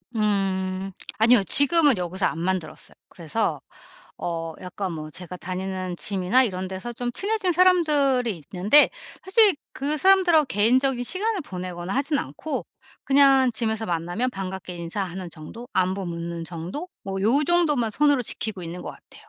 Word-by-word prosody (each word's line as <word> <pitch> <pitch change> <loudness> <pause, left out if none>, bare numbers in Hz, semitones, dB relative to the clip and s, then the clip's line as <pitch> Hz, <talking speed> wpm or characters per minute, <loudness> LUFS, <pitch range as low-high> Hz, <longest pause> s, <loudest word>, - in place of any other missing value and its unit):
음 195 -2 -1 0.3
아니요. 225 -1 +5
지금은 285 - +4
여기서 180 +2 -2
안 165 - -5
만들었어요. 175 -3 -4
그래서 180 +6 -2 0.6
어 165 -1 -4
약간 185 0 -5
뭐 155 -1 -7
제가 180 +3 -8
다니는 185 0 -5
짐이나 195 +7 +2
이런 190 -6 -2
데서 190 +6 -6
좀 245 +1 -4
친해진 395 - 0
사람들이 290 - +2
있는데 205 +11 +6 0.3
사실 400 +1 +5 0.2
그 290 +3 -2
사람들하고 355 -4 +4
개인적인 245 +4 +2
시간을 405 - 0
보내거나 180 -3 -6
하진 280 +1 0
않고 195 - -5 0.4
그냥 270 -2 +5
짐에서 220 -1 -2
만나면 175 +9 -2
반갑게 190 -2 -6
인사하는 175 +1 -5
정도 225 +11 -10
안부 190 +1 0
묻는 170 0 -5
정도 175 - -6 0.2
뭐 195 0 -4
요 275 +8 +3
정도만 300 -9 +2
선으로 285 +2 +2
지키고 210 -4 -4
있는 170 +2 -7
것 - - -6
같아요. - - -17
205 Hz, 340 characters per minute, -24 LUFS, 180-275 Hz, 0.6 s, 있는데